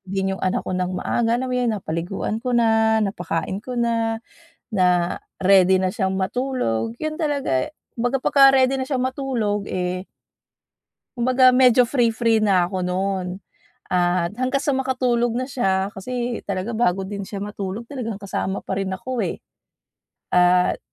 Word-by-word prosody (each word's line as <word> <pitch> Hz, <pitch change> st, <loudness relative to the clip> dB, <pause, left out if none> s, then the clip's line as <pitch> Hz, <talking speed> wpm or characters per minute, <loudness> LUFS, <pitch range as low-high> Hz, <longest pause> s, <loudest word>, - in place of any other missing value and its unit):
din 195 Hz, 0 st, -2 dB
yung -, -, -13 dB
anak 185 Hz, -, +1 dB
ko 185 Hz, -, -1 dB
ng 180 Hz, 0 st, -1 dB
maaga, 235 Hz, 0 st, 0 dB
alam 260 Hz, -, -2 dB
mo 250 Hz, -, -2 dB
yon, 245 Hz, -2 st, +1 dB
napaliguan 185 Hz, +2 st, -3 dB
ko 250 Hz, -, -1 dB
na, 220 Hz, -1 st, +3 dB
napakain 195 Hz, -3 st, -2 dB
ko 255 Hz, -, -6 dB
na, 230 Hz, -1 st, 0 dB, 0.5 s
na 180 Hz, -3 st, +2 dB, 0.3 s
ready 190 Hz, -1 st, +6 dB
na 185 Hz, -, +1 dB
siyang 190 Hz, 0 st, -1 dB
matulog. 225 Hz, -, -1 dB
'Yon 310 Hz, +1 st, -3 dB
talaga, 280 Hz, -, 0 dB
eh -, -, -12 dB, 0.3 s
kumbaga 245 Hz, +3 st, 0 dB
pagka-ready 270 Hz, -1 st, +5 dB
na 260 Hz, -, -2 dB
siyang 260 Hz, -3 st, -1 dB
matulog, 245 Hz, -6 st, -1 dB
eh 180 Hz, +1 st, -3 dB, 1.1 s
kumbaga 255 Hz, +1 st, +4 dB
medyo 250 Hz, -1 st, +5 dB
free-free 230 Hz, -3 st, +2 dB
na 185 Hz, -4 st, +3 dB
ako 185 Hz, -1 st, -3 dB
no'n 185 Hz, 0 st, -2 dB, 0.5 s
at 180 Hz, +2 st, +1 dB
hanggang 255 Hz, +2 st, 0 dB
sa 285 Hz, -2 st, 0 dB
makatulog 250 Hz, -3 st, 0 dB
na 255 Hz, +3 st, -2 dB
siya 195 Hz, -6 st, 0 dB
kasi 240 Hz, +4 st, -4 dB
talaga 200 Hz, +4 st, -3 dB
bago 190 Hz, -4 st, +1 dB
din 200 Hz, 0 st, -5 dB
siya 200 Hz, -, -7 dB
matulog 205 Hz, +2 st, -5 dB
talagang 230 Hz, -7 st, -5 dB
kasama 195 Hz, -1 st, -3 dB
pa 190 Hz, -, -4 dB
rin 190 Hz, -1 st, -2 dB
ako, 235 Hz, +3 st, -3 dB
eh. 170 Hz, -, -4 dB, 0.9 s
At 180 Hz, 0 st, +4 dB
215 Hz, 155 wpm, -22 LUFS, 190-250 Hz, 1.1 s, ready